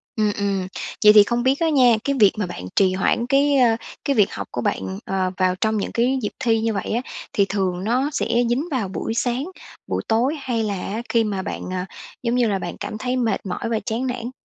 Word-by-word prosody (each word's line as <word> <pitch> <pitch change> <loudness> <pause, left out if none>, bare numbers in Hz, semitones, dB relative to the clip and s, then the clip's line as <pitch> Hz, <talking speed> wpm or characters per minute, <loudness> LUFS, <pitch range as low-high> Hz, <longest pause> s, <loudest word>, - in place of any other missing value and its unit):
Ừm, 215 -2 +2
ừm. 195 -2 -1 0.4
Vậy 210 0 +9
thì 210 -1 +9
không 240 +3 -1
biết 270 +3 +2
á 330 -1 +2
nha, 250 -6 +5
cái 280 0 0
việc 205 -3 +7
mà 205 - 0
bạn 90 - -7
trì 185 -1 +4
hoãn 230 +5 +1
cái, 280 +1 +3
ơ, 235 -3 +4 0.3
cái 280 - +1
việc 210 -2 +3
học - - -5
của 120 - -3
bạn, 95 -4 -2
ờ, 190 -1 -1
vào 185 -1 +2
trong 220 0 +2
những 200 - -2
cái 255 +3 +1
dịp 210 - -2
thi 230 -4 +2
như 225 -1 0
vậy 195 - -3
á 235 +3 0 0.3
thì 200 - +3
thường 185 -2 -1
nó 255 +7 +1
sẽ - - 0 0.2
dính 270 +8 0
vào 245 -8 -1
buổi 195 +4 -4
sáng, 245 +4 -1 0.4
buổi - - -1
tối 245 +7 +2
hay 235 -4 -1
là 205 -1 -1
á 220 +4 -3
khi 230 -1 +3
mà 200 -3 -2
bạn, - - -5
à, 180 0 -2 0.4
giống 235 +1 0
như 245 -2 +3
là, 195 -2 0
bạn - - -5
cảm 215 - -5
thấy 250 +2 -2
mệt 230 -5 -1
mỏi 190 +5 -3
và 225 -2 0
chán 240 +4 -2
nản? 245 0 -4
225 Hz, 245 wpm, -22 LUFS, 195-250 Hz, 0.4 s, Vậy